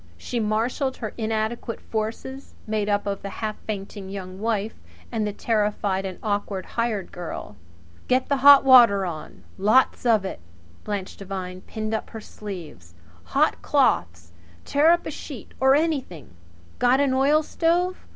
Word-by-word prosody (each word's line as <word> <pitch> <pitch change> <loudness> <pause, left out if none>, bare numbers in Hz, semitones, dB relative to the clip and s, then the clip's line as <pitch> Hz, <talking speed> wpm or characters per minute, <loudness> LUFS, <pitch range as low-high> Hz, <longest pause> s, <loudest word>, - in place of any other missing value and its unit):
She 240 - -4
marshalled 230 +5 -1
her 220 - -4
little 225 - -4
inadequate 220 +1 -2
forces, 230 +5 -5
made 215 -1 -1
up 205 0 +1
of 200 -1 -3
the 200 - -5
half 215 +1 -4
fainting 200 -2 -5
Young 190 -1 -7
Wife 220 0 -1 0.4
and 220 -3 -1
the - - -2
terrified 205 -3 0
and 185 - -7
awkward 205 -3 -2
hired 230 -5 -2
girl. 170 -11 -7 0.5
"Get 255 +1 +2
the 280 - +1
hot 280 +1 +8
water 235 -7 +7
on 155 - -7 0.2
lots 215 +7 +3
of 220 -5 +3
it!" 190 - -5 0.4
Blanche 200 -3 -4
Devine 185 -2 -6
pinned 215 0 -4
up 220 - -3
her 225 - -7
sleeves. 170 - -9 0.3
"Hot - - +1
cloths! 85 0 +1 0.3
Tear 295 +3 +4
up 345 +1 +3
a - - -4
sheet 275 -6 -9
or 265 +1 +5
anything! 275 - -2 0.5
Got 250 +2 +4
an 285 -2 +2
oilstove? 330 +6 +2
215 Hz, 150 wpm, -24 LUFS, 195-255 Hz, 0.5 s, hot